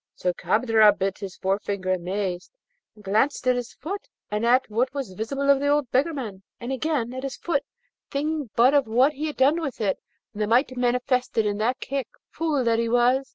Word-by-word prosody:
So 180 Hz, -1 st, -1 dB
Kadrab 215 Hz, +3 st, +4 dB
bit 195 Hz, 0 st, -2 dB
his 195 Hz, -3 st, -7 dB
forefinger 195 Hz, 0 st, -1 dB
amazed, 185 Hz, 0 st, -3 dB, 0.5 s
and 210 Hz, -, -17 dB
glanced 220 Hz, +9 st, +1 dB
at 255 Hz, 0 st, +4 dB
his 245 Hz, -1 st, -4 dB
foot, 390 Hz, +8 st, -6 dB, 0.2 s
and 210 Hz, +1 st, -1 dB
at 255 Hz, +2 st, +4 dB
what 240 Hz, +4 st, 0 dB
was 270 Hz, -9 st, -4 dB
visible 270 Hz, +8 st, -3 dB
of 275 Hz, -, +4 dB
the 285 Hz, -, -1 dB
old 290 Hz, -3 st, +1 dB
beggarman, 260 Hz, -, -1 dB, 0.2 s
and 240 Hz, +2 st, -5 dB
again 265 Hz, -3 st, -1 dB
at 260 Hz, -, -5 dB
his 270 Hz, -1 st, -5 dB
foot, 305 Hz, -5 st, 0 dB, 0.5 s
thinking 295 Hz, -2 st, -2 dB
but 250 Hz, +4 st, +5 dB
of 285 Hz, -5 st, +3 dB
what 255 Hz, +6 st, +3 dB
he 300 Hz, +2 st, -3 dB
had 300 Hz, -, -6 dB
done 285 Hz, +6 st, +3 dB
with 275 Hz, -6 st, -4 dB
it, 200 Hz, -4 st, 0 dB, 0.3 s
and 210 Hz, -, -5 dB
the 210 Hz, -, +1 dB
might 255 Hz, +4 st, +2 dB
manifested 250 Hz, -2 st, +1 dB
in 205 Hz, 0 st, -1 dB
that 245 Hz, +5 st, 0 dB
kick, 275 Hz, -3 st, -3 dB, 0.2 s
fool 305 Hz, -5 st, 0 dB
that 230 Hz, -1 st, +2 dB
he 230 Hz, 0 st, 0 dB
was! 245 Hz, +3 st, +3 dB
245 Hz, 200 wpm, -25 LUFS, 210-275 Hz, 0.5 s, but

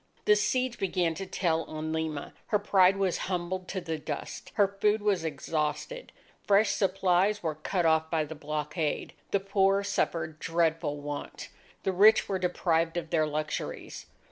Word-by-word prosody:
The 210 Hz, -, +6 dB
siege 250 Hz, +3 st, 0 dB
began 180 Hz, -3 st, 0 dB
to 195 Hz, +3 st, -6 dB
tell 165 Hz, -3 st, 0 dB
on 155 Hz, 0 st, -4 dB
Lima. 160 Hz, -2 st, -3 dB
Her 210 Hz, -, +3 dB
pride 195 Hz, -2 st, +4 dB
was 190 Hz, -3 st, 0 dB
humbled 180 Hz, 0 st, -2 dB
to 190 Hz, -, -3 dB
the 165 Hz, -3 st, -4 dB
dust. 150 Hz, -1 st, -6 dB
Her 205 Hz, -2 st, +5 dB
food 205 Hz, +2 st, +1 dB
was 200 Hz, -5 st, +1 dB
exhausted. 155 Hz, -, -3 dB, 0.4 s
Fresh 205 Hz, +1 st, +4 dB
supplies 195 Hz, +1 st, +2 dB
were 160 Hz, -2 st, 0 dB
cut 170 Hz, +4 st, -2 dB
off 160 Hz, 0 st, +3 dB
by 160 Hz, -2 st, +1 dB
the 155 Hz, -, -7 dB
blockade. 150 Hz, +1 st, -3 dB, 0.2 s
The 200 Hz, -, +2 dB
poor 195 Hz, 0 st, +2 dB
suffered 165 Hz, -5 st, -1 dB
dreadful 165 Hz, -3 st, 0 dB
want. 145 Hz, 0 st, -6 dB, 0.3 s
The 190 Hz, -, +1 dB
rich 210 Hz, +4 st, +6 dB
were 190 Hz, -1 st, -1 dB
deprived 170 Hz, -2 st, 0 dB
of 165 Hz, -2 st, -4 dB
their 155 Hz, -2 st, +2 dB
luxuries. 150 Hz, 0 st, -4 dB
175 Hz, 160 wpm, -29 LUFS, 160-195 Hz, 0.4 s, The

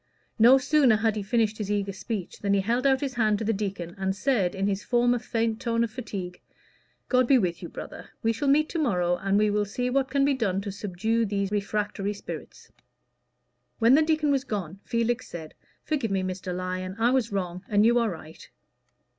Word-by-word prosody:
No 240 Hz, +4 st, +8 dB
sooner 270 Hz, -3 st, +4 dB
had 220 Hz, 0 st, +1 dB
he 210 Hz, -, -2 dB
finished 220 Hz, +1 st, 0 dB
his 205 Hz, -2 st, -3 dB
eager 200 Hz, -1 st, -1 dB
speech, 200 Hz, -1 st, -5 dB
than 200 Hz, -1 st, +1 dB
he 195 Hz, -, +2 dB
held 240 Hz, +6 st, +1 dB
out 265 Hz, -1 st, +3 dB
his 275 Hz, -3 st, -2 dB
hand 215 Hz, -3 st, +2 dB
to 220 Hz, -, -4 dB
the 225 Hz, -, +1 dB
deacon, 195 Hz, -4 st, -4 dB
and 190 Hz, 0 st, -1 dB
said, 205 Hz, -6 st, +1 dB
in 195 Hz, +1 st, -1 dB
his 200 Hz, 0 st, -1 dB
former 245 Hz, 0 st, +2 dB
faint 225 Hz, -1 st, -1 dB
tone 230 Hz, 0 st, +1 dB
of 230 Hz, -, -2 dB
fatigue 190 Hz, -7 st, -6 dB, 0.7 s
"God 255 Hz, -1 st, +3 dB
be 270 Hz, -, +6 dB
with 175 Hz, -7 st, -1 dB
you, -, -, -7 dB
brother. -, -, -9 dB
We 225 Hz, 0 st, +2 dB
shall 255 Hz, +6 st, -2 dB
meet 300 Hz, +3 st, +4 dB
to 335 Hz, -, -3 dB
morrow, 180 Hz, -, +1 dB
and 195 Hz, +1 st, +1 dB
we 210 Hz, 0 st, +3 dB
will 210 Hz, 0 st, +1 dB
see 245 Hz, +5 st, -2 dB
what 270 Hz, 0 st, +1 dB
can 275 Hz, +1 st, +2 dB
be 285 Hz, -, +3 dB
done 205 Hz, -8 st, 0 dB
to 200 Hz, 0 st, -5 dB
subdue 210 Hz, +4 st, -1 dB
these 200 Hz, -1 st, -1 dB
refractory 205 Hz, 0 st, -2 dB
spirits." 200 Hz, -, -9 dB, 1.1 s
When 230 Hz, +2 st, +5 dB
the 300 Hz, -, +6 dB
deacon 310 Hz, -2 st, +2 dB
was 270 Hz, -2 st, +1 dB
gone, 195 Hz, -, -5 dB
Felix 235 Hz, 0 st, -1 dB
said, 160 Hz, -2 st, -8 dB, 0.3 s
"Forgive 275 Hz, -8 st, -1 dB
me, 195 Hz, -1 st, 0 dB
Mr. 185 Hz, 0 st, -4 dB
Lyon; 185 Hz, +1 st, -4 dB
I 230 Hz, +2 st, +3 dB
was 255 Hz, -4 st, +1 dB
wrong, 180 Hz, -2 st, -3 dB
and 205 Hz, 0 st, +4 dB
you 240 Hz, +1 st, +4 dB
are 230 Hz, -2 st, +1 dB
right." 160 Hz, -3 st, -10 dB
215 Hz, 210 wpm, -26 LUFS, 195-245 Hz, 1.1 s, No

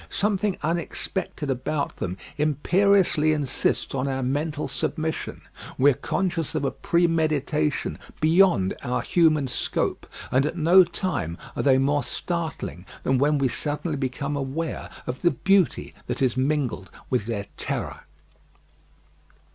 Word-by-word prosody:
Something 200 Hz, -1 st, 0 dB
unexpected 165 Hz, -1 st, -2 dB
about 135 Hz, +3 st, -2 dB
them 90 Hz, +1 st, -3 dB, 0.2 s
imperiously 155 Hz, +1 st, +3 dB
insists 145 Hz, -4 st, 0 dB
on 135 Hz, 0 st, -1 dB
our 135 Hz, -1 st, -1 dB
mental 145 Hz, +3 st, -1 dB
submission; 155 Hz, +4 st, -3 dB, 0.4 s
we 140 Hz, +2 st, +6 dB
are -, -, +1 dB
conscious 170 Hz, +2 st, -2 dB
of 145 Hz, -2 st, 0 dB
a -, -, +1 dB
premeditation 155 Hz, -3 st, +1 dB, 0.2 s
beyond 160 Hz, -, +4 dB
our 125 Hz, -, -1 dB
human 155 Hz, -5 st, +3 dB
scope, 125 Hz, -, -2 dB, 0.2 s
and 130 Hz, +1 st, +4 dB
at 165 Hz, -, -4 dB
no 175 Hz, +4 st, +7 dB
time 170 Hz, -, -3 dB, 0.2 s
are -, -, -1 dB
they 135 Hz, -2 st, +5 dB
more 140 Hz, +2 st, +2 dB
startling 160 Hz, -, -4 dB, 0.2 s
than 130 Hz, -1 st, +2 dB
when 145 Hz, +2 st, +3 dB
we 135 Hz, -1 st, +2 dB
suddenly 150 Hz, +5 st, -2 dB
become 140 Hz, +2 st, -2 dB
aware 145 Hz, +4 st, -3 dB, 0.2 s
of 125 Hz, +1 st, -4 dB
the 175 Hz, -, +5 dB
beauty 195 Hz, 0 st, +2 dB
that -, -, -2 dB
is 130 Hz, -3 st, +2 dB
mingled 130 Hz, -, -1 dB, 0.2 s
with 120 Hz, -5 st, +1 dB
their 105 Hz, -3 st, -2 dB
terror. -, -, -3 dB
150 Hz, 130 wpm, -25 LUFS, 135-170 Hz, 0.4 s, no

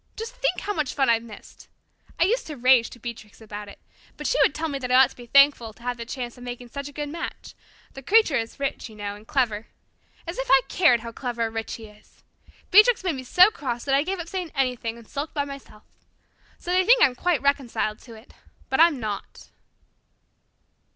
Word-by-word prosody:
Just 460 Hz, +3 st, -6 dB
think -, -, 0 dB
how 415 Hz, -, -2 dB
much 305 Hz, -7 st, -2 dB
fun 270 Hz, -3 st, +2 dB
I've 230 Hz, -1 st, +2 dB
missed! 225 Hz, -3 st, -14 dB, 0.5 s
I -, -, +5 dB
used 475 Hz, +7 st, 0 dB
to 300 Hz, -2 st, -7 dB
rage 250 Hz, -1 st, +4 dB
to -, -, -12 dB
Beatrix 230 Hz, -3 st, -9 dB
about 210 Hz, -2 st, -8 dB
it, -, -, -13 dB, 0.4 s
but -, -, -8 dB
she -, -, +1 dB
would -, -, +3 dB
tell 325 Hz, +1 st, -2 dB
me 280 Hz, -3 st, -4 dB
that 250 Hz, -2 st, -5 dB
I -, -, +5 dB
ought 265 Hz, 0 st, +6 dB
to -, -, -16 dB
be 240 Hz, -1 st, -12 dB
thankful 275 Hz, -5 st, +4 dB
to 235 Hz, -, -19 dB
have 245 Hz, 0 st, -3 dB
the 230 Hz, -1 st, -7 dB
chance 245 Hz, -2 st, -5 dB
of -, -, -11 dB
making 245 Hz, 0 st, -7 dB
such 280 Hz, +2 st, -6 dB
a -, -, -9 dB
good 295 Hz, +1 st, -5 dB
match 330 Hz, +3 st, -7 dB, 0.4 s
the 270 Hz, -, -9 dB
Creature 390 Hz, -, +4 dB
is 225 Hz, +3 st, -5 dB
rich, 275 Hz, -3 st, -3 dB
you 215 Hz, -, -14 dB
know, 205 Hz, -1 st, -5 dB
and 210 Hz, +2 st, -16 dB
clever. 230 Hz, -7 st, 0 dB, 0.6 s
As 340 Hz, +6 st, -6 dB
if -, -, -3 dB
I -, -, +7 dB
cared 255 Hz, -, +4 dB
how 230 Hz, 0 st, -7 dB
clever 240 Hz, -1 st, -3 dB
or 225 Hz, -, -2 dB
rich 225 Hz, 0 st, -4 dB
he 225 Hz, -, -10 dB
is! 210 Hz, -1 st, -20 dB, 0.5 s
Beatrix 425 Hz, +3 st, +6 dB
made 360 Hz, -3 st, 0 dB
me 260 Hz, -, -6 dB
so 365 Hz, -, +6 dB
cross 245 Hz, -, -4 dB
that 275 Hz, -, 0 dB
I 275 Hz, -, +4 dB
gave 375 Hz, +5 st, -3 dB
up 340 Hz, -, -6 dB
saying 360 Hz, -1 st, -4 dB
anything 250 Hz, -4 st, -1 dB
and 230 Hz, -2 st, -15 dB
sulked 290 Hz, +3 st, -5 dB
by 285 Hz, -1 st, 0 dB
myself. 275 Hz, -6 st, -11 dB, 0.7 s
So 350 Hz, -, -6 dB
they 370 Hz, +1 st, +4 dB
think 485 Hz, +4 st, +5 dB
I'm 260 Hz, -, +5 dB
quite 325 Hz, +2 st, 0 dB
reconciled 265 Hz, -6 st, 0 dB
to 230 Hz, -3 st, -13 dB
it, 220 Hz, +3 st, -16 dB, 0.4 s
but 265 Hz, -, 0 dB
I'm 325 Hz, -4 st, +5 dB
not." 210 Hz, -3 st, -6 dB
265 Hz, 230 wpm, -24 LUFS, 230-325 Hz, 0.7 s, I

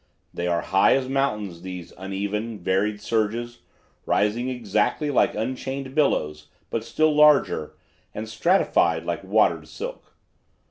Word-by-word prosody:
They 85 Hz, -, -3 dB
are 85 Hz, -1 st, +1 dB
high 95 Hz, 0 st, +4 dB
as 135 Hz, -1 st, -1 dB
mountains, 105 Hz, -10 st, -1 dB
these 90 Hz, -2 st, -8 dB
uneven, 100 Hz, +4 st, -4 dB
varied 100 Hz, +3 st, 0 dB
surges, 115 Hz, +2 st, -2 dB, 0.5 s
rising 115 Hz, +5 st, +1 dB
exactly 125 Hz, +4 st, 0 dB
like -, -, +2 dB
unchained 130 Hz, +4 st, -4 dB
billows, 75 Hz, -, 0 dB, 0.2 s
but 115 Hz, -, -2 dB
still 155 Hz, +6 st, +1 dB
larger, 150 Hz, -, +4 dB, 0.4 s
and 110 Hz, +1 st, -6 dB
stratified 175 Hz, -, +2 dB
like -, -, -3 dB
watered -, -, +2 dB
silk. -, -, -8 dB
110 Hz, 125 wpm, -24 LUFS, 95-135 Hz, 0.5 s, high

